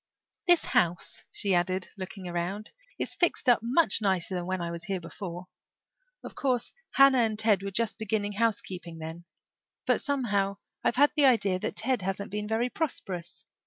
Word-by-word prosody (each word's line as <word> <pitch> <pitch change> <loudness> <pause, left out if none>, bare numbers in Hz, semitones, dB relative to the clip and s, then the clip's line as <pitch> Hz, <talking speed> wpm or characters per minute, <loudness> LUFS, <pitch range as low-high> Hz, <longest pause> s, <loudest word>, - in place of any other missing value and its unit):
"This 350 -1 +6
house," 170 -1 +1
she 200 -2 -1
added, 185 +1 0
looking 190 -1 -7
around, 180 +5 -3 0.3
"is - - -3
fixed 345 -6 +1
up 245 -2 +6
much 250 +2 +3
nicer 190 -3 +1
than 175 -1 -3
when 185 0 -1
I 170 -1 -3
was 170 +2 -6
here 195 -2 -2
before. 175 +1 -7 0.8
Of - - -8
course 255 -4 -1 0.2
Hannah 275 -1 +6
and 220 -2 +1
Ted 215 -3 +3
were 200 - -3
just 225 +3 -1
beginning 215 -1 -1
housekeeping 195 -6 -2
then. 160 +2 -7 0.6
But - - +2
somehow 205 -8 0 0.3
I've - - +2
had 290 +3 +5
the 290 -3 +5
idea 200 -7 +3
that - - -3
Ted 250 0 0
hasn't 195 +2 -3
been 210 0 -3
very 225 +3 +1
prosperous. 190 - -4
200 Hz, 170 wpm, -28 LUFS, 180-230 Hz, 0.8 s, This